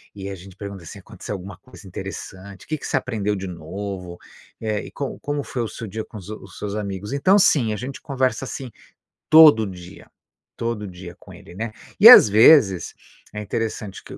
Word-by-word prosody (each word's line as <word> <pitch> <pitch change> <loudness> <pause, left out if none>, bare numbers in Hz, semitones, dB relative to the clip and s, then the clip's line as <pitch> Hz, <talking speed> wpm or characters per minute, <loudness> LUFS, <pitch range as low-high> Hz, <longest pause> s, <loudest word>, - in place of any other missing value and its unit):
e 100 -1 -7
a 100 - -6
gente 95 0 -14
pergunta, 100 -3 -8
assim: 80 - -11
"Aconteceu 105 - -8
alguma 95 0 -9
coisa 105 -2 -16
interessante? 95 +1 -9
Que 155 - -2
que - - -10
você - - 0
aprendeu 110 -6 -2
de 95 -1 -6
novo? 90 +1 -7 0.4
Eh, 110 -2 -2
e - - -11
como 140 -2 -5
como 145 0 -3
foi 125 - -5
o - - -3
seu 110 +1 -8
dia 110 +3 -5
com 110 - -12
os 95 - -11
os 100 -3 -10
seus 100 0 -5
amigos". 100 +1 -5
Então, 185 +9 +4
sim, 130 - +3
a - - -4
gente 130 +5 -7
conversa 130 -3 -1
assim 130 -1 -7 0.6
todo 155 -8 +8
dia, 90 -1 -11 0.5
todo 115 -3 -3
dia 90 -1 -11
com - - -16
ele, - - -14
né. 110 +3 -4 0.3
E, - - +11
às - - +11
vezes, 105 - +5 0.4
é 105 - -5
interessante 105 -1 -5
que - - -11
105 Hz, 200 wpm, -22 LUFS, 95-120 Hz, 0.6 s, E